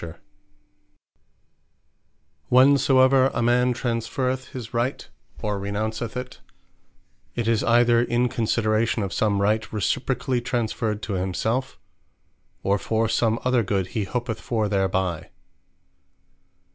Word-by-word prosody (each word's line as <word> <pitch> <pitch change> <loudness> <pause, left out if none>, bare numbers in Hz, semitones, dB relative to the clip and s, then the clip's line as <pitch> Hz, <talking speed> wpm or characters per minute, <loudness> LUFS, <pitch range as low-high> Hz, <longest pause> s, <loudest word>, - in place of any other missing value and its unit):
Not 85 - -6
All - - -10
Rights 75 -2 -34
Are - - -47 1.4
Alienable 130 +2 +8
Whensoever 130 -1 +4
a - - 0
man 125 +1 +3
Transferreth 125 +2 -2
his 120 -3 -8
Right, 120 +3 -2 0.4
or 105 -2 -1
Renounceth 110 +4 -3
it; 125 0 -7 1.0
it 120 -2 -2
is 115 -2 +2
either 120 0 +4
in 120 +1 +1
consideration 110 -1 0
of 95 - -4
some 100 -2 +1
Right 110 +1 0
reciprocally 125 +4 -1
transferred 115 -3 -2
to 105 - -3
himselfe; 95 +7 -2 0.9
or 100 +1 +1
for 110 +2 0
some 115 0 +1
other 125 -1 +3
good 95 -3 -1
he 105 -3 -2
hopeth 115 +1 -4
for 110 -3 -1
thereby. 95 -4 -1
115 Hz, 125 wpm, -24 LUFS, 105-125 Hz, 1.4 s, Alienable